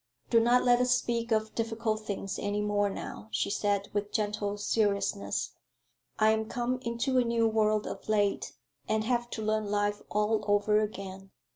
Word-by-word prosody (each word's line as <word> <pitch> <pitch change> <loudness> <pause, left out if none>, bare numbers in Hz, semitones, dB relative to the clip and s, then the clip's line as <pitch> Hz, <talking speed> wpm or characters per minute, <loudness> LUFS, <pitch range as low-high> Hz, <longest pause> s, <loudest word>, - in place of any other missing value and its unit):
"Do 230 - +6
not 240 +2 +4
let 245 0 +4
us 250 0 +4
speak 235 0 -2
of 220 0 +1
difficult 225 -1 -2
things 195 -1 -3
any 205 0 -1
more 205 -1 +1
now," 200 - -7
she - - -1
said, 200 -1 0
with 205 0 -2
gentle 205 -1 -1
seriousness. 205 -1 0 0.7
"I 215 0 +5
am 220 0 -1
come 245 +1 -1
into 235 +2 0
a - - +4
new 230 -1 +2
world 215 -1 +2
of - - -7
late, 205 -2 +1 0.4
and 215 0 +1
have 240 +1 0
to 220 - -4
learn 215 0 0
life 205 0 0
all 210 +1 +1
over 205 +1 +3
again. 195 -2 -5
215 Hz, 170 wpm, -30 LUFS, 205-230 Hz, 0.7 s, Do